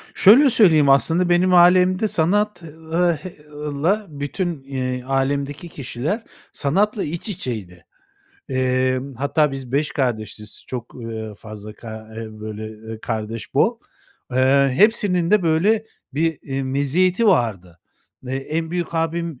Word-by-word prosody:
Şöyle 255 +8 +7
söyleyeyim, 160 - +5
aslında 165 +6 +3
benim 180 +1 +3
ailemde 180 +3 +5
sanat 205 +4 +1
ııı, 165 +2 -1
h 185 - -8 0.2
ııı, 145 -1 -5
la 205 +4 +2
bütün, 145 +1 -4
eee, 130 -2 -3
ailemdeki 140 +4 -2
kişiler 145 - -4 0.3
sanatla 195 +8 0
iç 170 +7 -4
içeydi. 105 - -6 0.6
Emm, 130 0 0
hatta 140 +3 +1
biz 130 -2 -7
5 150 +1 0
kardeşiz, 110 -5 -3
çok, 120 -2 -7
ııı, 110 -3 -6
fazla 105 0 -10
ka 110 -1 -9
eee, 115 0 -5
böyle, 110 0 -6
eee, 110 0 -9
kardeş 110 -1 -5
bol, - - +2 0.5
eee, 135 +1 +4
hepsinin 200 -5 +3
de, 210 -3 +4
böyle, 195 +7 +2 0.3
bir, 160 0 0
iii, 135 -1 -3
meziyeti 175 - +1
vardı. 100 - +1 0.5
Eee, 130 +1 -2
en 160 +4 -3
büyük 175 -1 -3
abim 165 -3 -2
145 Hz, 135 wpm, -21 LUFS, 125-175 Hz, 0.6 s, Şöyle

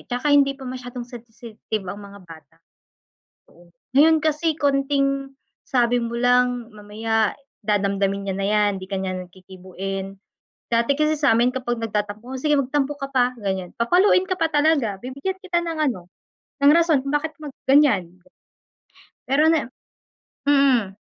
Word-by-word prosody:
'tsaka 250 +4 0
hindi 275 -1 +4
pa 265 - -11
masyadong 250 -1 -7
sensitive 225 -3 -8
ang 205 +3 -6
mga 200 0 -12
bata 165 -2 -15 0.9
noon. 175 0 -21 0.3
Ngayon 320 +3 +6
kasi 310 0 0
konting, 275 -1 0 0.4
sabi 245 -2 +2
mo 235 0 -4
lang, 245 -1 +1
mamaya 215 +1 -1 0.3
dadamdamin 200 -1 0
niya 190 - -1
na 195 - -1
'yan, 210 -1 +3
hindi 185 - -9
ka 195 - -2
niyan 185 -1 -4
kikibuin. 190 +1 -7 0.5
Dati 235 +4 +2
kasi 305 +2 +1
samin 245 -4 +3
kapag 240 -2 -2
nagtatampo, 210 0 -3
"O 255 - -7
sige, 300 0 +2
magtampo 275 +2 -1
ka 275 - -4
pa," 250 -2 +2
ganiyan. 190 -3 -3
Papaluin 360 - +4
ka 370 - -1
pa 330 - +2
talaga, 290 -8 +2
bibigyan 275 +10 -4
kita 360 -2 0
ng 330 -2 -4
ano, 180 -6 -8 0.6
ng 285 - +7
rason 330 -4 +3
kung 275 +2 -3
bakit 310 +2 -1
mag-ganiyan. 270 - +2 1.2
Pero 285 +4 +3
na 305 -7 0 0.8
mm. 255 -9 +3
245 Hz, 145 wpm, -22 LUFS, 205-285 Hz, 1.2 s, ng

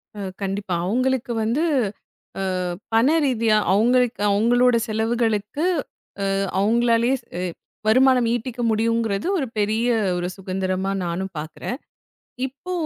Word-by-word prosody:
அ - - -8 0.2
கண்டிப்பா 195 -1 -2
அவங்களுக்கு 255 +3 0
வந்து 235 +9 +1 1.0
ஆ - - -1 0.3
பணரீதியா 240 -3 +3 0.2
அவங்களுக்கு 245 +2 +2
அவங்களோட 240 +4 +4
செலவுகளுக்கு 225 +4 0 0.7
அ - - +1 0.3
அவங்களாலயே 235 +3 +3 0.2
அ - - -2 0.5
வருமானம் 255 +1 +5
ஈட்டிக்க 240 +1 -4
முடியும்ங்கறது 225 -1 0
ஒரு 275 - -1
பெரிய 215 +3 +1 0.3
ஒரு 175 0 -2
சுகந்திரமா 190 0 -2
நானும் 185 +3 -3
பார்க்குறேன். 155 +10 -5 0.7
இப்போ 280 +7 -8
230 Hz, 105 wpm, -22 LUFS, 200-250 Hz, 1.0 s, வருமானம்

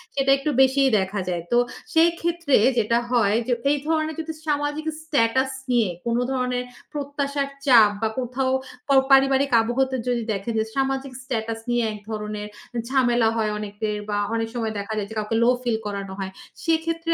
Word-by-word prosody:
সেটা 275 0 +2
একটু 275 +3 -2
বেশিই 265 +1 +4
দেখা 190 +2 -2
যায়। 170 -2 -2
তো 240 - +4 0.4
সেই 325 +1 +6
ক্ষেত্রে 340 -4 +2 0.2
যেটা 230 +1 +2
হয় 215 -4 +3
যে 245 - +2 0.2
এই 295 - +2
ধরনের 315 -1 0
যদি 320 0 -4
সামাজিক 295 +1 -1 0.2
স্ট্যাটাস 265 -3 +1 0.2
নিয়ে 230 -6 +3 0.2
কোনো 235 +1 +1
ধরনের 250 -1 -1 0.3
প্রত্যাশার 280 -1 -2 0.2
চাপ 230 -6 +7
বা 220 - +1
কোথাও 260 +1 -1 0.4
প - - -31 0.2
পারিবারিক 270 0 +5
আবহতে 260 +3 0
যদি 240 -2 0
দেখেন 200 +4 -3
যে 220 - +1
সামাজিক 270 0 -1
স্ট্যাটাস 225 -3 -3
নিয়ে 240 0 +2
একধরনের 210 0 -5 0.4
ঝামেলা 245 -4 +3
হয় 215 -2 0
অনেকের 210 0 -3
বা 205 - 0 0.2
অনেক 225 0 -1
সময় 225 -2 -2
দেখা 200 +2 -4
যায় 205 -1 -2
যে 220 - -9
কাউকে 215 +1 -1
লো 240 - +5
ফিল 235 -3 +1
করানো 200 -2 -4
হয়। 190 -1 -4 0.3
সেক্ষেত্রে 330 0 0
245 Hz, 170 wpm, -23 LUFS, 220-275 Hz, 0.4 s, চাপ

